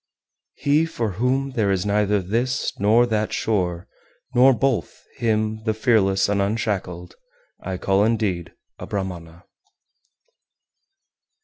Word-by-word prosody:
385. 145 Hz, +1 st, +4 dB
He -, -, +1 dB
for 115 Hz, -3 st, -2 dB
whom 135 Hz, +3 st, 0 dB
there 110 Hz, -6 st, 0 dB
is 95 Hz, -1 st, 0 dB
neither 105 Hz, -1 st, +1 dB
this 120 Hz, +8 st, -1 dB
nor 110 Hz, +4 st, +4 dB
that 110 Hz, -2 st, -1 dB
shore, 90 Hz, -5 st, -1 dB, 0.5 s
nor 130 Hz, +2 st, +6 dB
both, 120 Hz, -, -1 dB
him, 110 Hz, -2 st, 0 dB
the 110 Hz, -1 st, -1 dB
fearless 105 Hz, -5 st, +2 dB
and 100 Hz, 0 st, +1 dB
unshackled, 100 Hz, -4 st, -2 dB, 0.5 s
I 95 Hz, -1 st, -4 dB
call 95 Hz, +2 st, +2 dB
indeed 105 Hz, -6 st, -1 dB, 0.3 s
a -, -, -7 dB
Brahmana. 85 Hz, -4 st, -5 dB
105 Hz, 120 wpm, -22 LUFS, 95-115 Hz, 0.5 s, nor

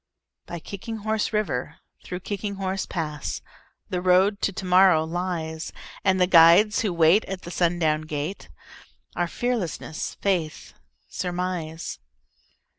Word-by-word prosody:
By 175 Hz, -, -5 dB
Kicking 200 Hz, +7 st, -7 dB
Horse 220 Hz, -1 st, 0 dB
River, 210 Hz, -, -1 dB, 0.3 s
through 180 Hz, 0 st, -6 dB
Kicking 200 Hz, +1 st, -4 dB
Horse 190 Hz, 0 st, -2 dB
Pass, 150 Hz, -4 st, -4 dB, 0.5 s
The 180 Hz, -1 st, -1 dB
Road 185 Hz, +3 st, +3 dB
to -, -, +1 dB
Tomorrow 185 Hz, -3 st, +4 dB
lies; 165 Hz, -1 st, -3 dB, 0.3 s
And 190 Hz, -1 st, +3 dB
the 180 Hz, -, +5 dB
guides 180 Hz, +4 st, +6 dB
who 210 Hz, -, 0 dB
wait 170 Hz, +5 st, +4 dB
at 190 Hz, -1 st, -6 dB
the 175 Hz, -, -7 dB
sundown 165 Hz, -3 st, +1 dB
gate 150 Hz, +5 st, -4 dB, 0.7 s
Are 175 Hz, -, 0 dB
Fearlessness, 200 Hz, -8 st, -3 dB
Faith, 175 Hz, -6 st, -2 dB, 0.3 s
Surmise. 175 Hz, -, -4 dB
180 Hz, 120 wpm, -25 LUFS, 165-195 Hz, 0.7 s, guides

